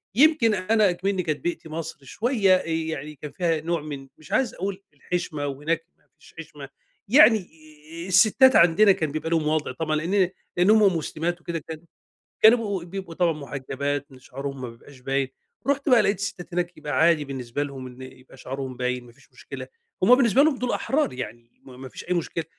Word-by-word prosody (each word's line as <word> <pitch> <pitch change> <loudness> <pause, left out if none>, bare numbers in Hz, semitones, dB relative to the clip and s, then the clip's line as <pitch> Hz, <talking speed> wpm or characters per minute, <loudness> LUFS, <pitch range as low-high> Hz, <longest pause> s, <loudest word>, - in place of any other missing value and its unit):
يمكن 275 -4 +5
أنا 210 +1 +2
إكمنّي 185 +1 -1
كانت 155 -3 -2
بيئتي 175 -2 -4
مصر 165 +1 -5
شوية 210 - +2
آآ، - - -2
يعني 160 -2 -3
كان 150 +1 -9
فيها 165 -3 0
نوع 170 0 -1
من 145 -3 -7
مش 155 - -16
عايز 260 -3 +1
اقول 195 +1 -5
الحشمة 155 -1 -3
وهناك 150 +4 -2
ما - - -35 0.2
فيش - - -19
حشمة، 150 -4 -10 0.4
يعني 235 -1 +7 0.7
آآ، - - -8
الستات 215 +8 +5
عندنا 175 +5 +6
كان 160 -5 -1
بيبقى 155 +2 -3
لهم 165 -2 +1
وضع 155 -2 0
طبعًا 155 +4 -2
لإن 180 +4 +1 0.3
لإن 180 +3 +4
هُم 210 -5 +5
مسلمات 170 +2 -3
وكده 170 -1 -4
كان 155 +1 -9 0.6
كانوا 220 +3 +8
بيبقوا 200 -6 -3
بيبقوا 180 -1 -7
طبعًا 170 -1 +2
محجبات، 140 -1 -4
إن 130 - -14
شعرهم 135 +1 -7
ما 125 - -5
بيبقاش 130 +3 -15
باين، 135 +1 -1 0.4
رُحت 280 +1 +1
بقى 245 -3 +6
لقيت 200 -2 0
الستات 200 -3 -5
هناك 175 0 -2
يبقى 145 - -5
عادي 160 -2 +4
بالنسبة 135 0 -4
لهم 135 -2 -7
إن 125 +1 -12
يبقى 130 0 -13
شعرهم 130 -1 -6
باين، 125 0 -2
ما 120 - -15
فيش 135 +4 -24
مشكلة، - - -9 0.4
هُم 245 +6 +8
بالنسبة 255 +1 +4
لهم 305 -3 +2
دول 250 0 -2
أحرار، 275 - 0
يعني 120 -1 -9
ما 130 -2 -13
ما 130 0 -9
فيش - - -10
أي 180 - 0
مشكلة، 170 -1 -2
165 Hz, 195 wpm, -24 LUFS, 140-195 Hz, 0.7 s, كانوا